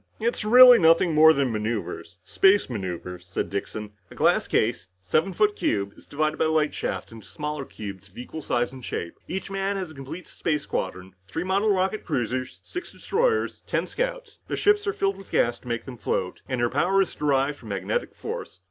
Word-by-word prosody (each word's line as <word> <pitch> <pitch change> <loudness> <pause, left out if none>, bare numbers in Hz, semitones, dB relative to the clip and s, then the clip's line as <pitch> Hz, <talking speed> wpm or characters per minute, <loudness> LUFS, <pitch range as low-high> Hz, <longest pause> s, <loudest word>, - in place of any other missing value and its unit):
"It's 230 0 -1
really 245 +2 +9
nothing 165 0 +5
more 155 +1 +8
than 140 -4 +1
maneuvers. 105 -5 -4
Space 195 - +3
maneuvers," 90 -3 -5
said 90 - -3
Dixon. 105 +1 -4 0.2
"A - - -13
glass - - +3
case, 115 -2 +1
a 95 0 -38
seven 155 - +2
foot 210 +3 +2
cube, 100 -2 -1
is - - -16
divided 155 +1 -1
by - - +3
light 155 -1 +2
shafts - - -4
into 110 -3 -12
smaller 150 -2 -4
cubes 100 -4 -8
of 95 - -22
equal 155 +6 -7
shape 120 -3 0
and 130 -1 -11
size. 85 -6 -4 0.2
Each 190 +1 -4
man 195 +1 -1
has 185 -4 -4
a - - -11
complete 145 +6 -8
space 150 -3 -2
squadron. 95 -4 -4
Three 165 - -3
model 200 +3 +2
rocket 190 +2 0
cruisers, 130 -3 -2
six 360 - -6
destroyers 450 +1 0
and - - -35
ten - - 0
scouts. - - -4
The - - -2
ships 415 0 +3
are 405 - +1
filled 195 - 0
with 195 - -13
gas 120 - +2
to - - -16
make 115 -1 -3
them 125 -2 -8
float, 90 -1 -2
and 130 -2 -1
your 120 0 +1
power 195 +1 +3
is - - -7
derived 140 -1 +1
from 115 - -11
magnetic 95 -2 -2
force. 95 - -6
150 Hz, 205 wpm, -25 LUFS, -, 0.2 s, really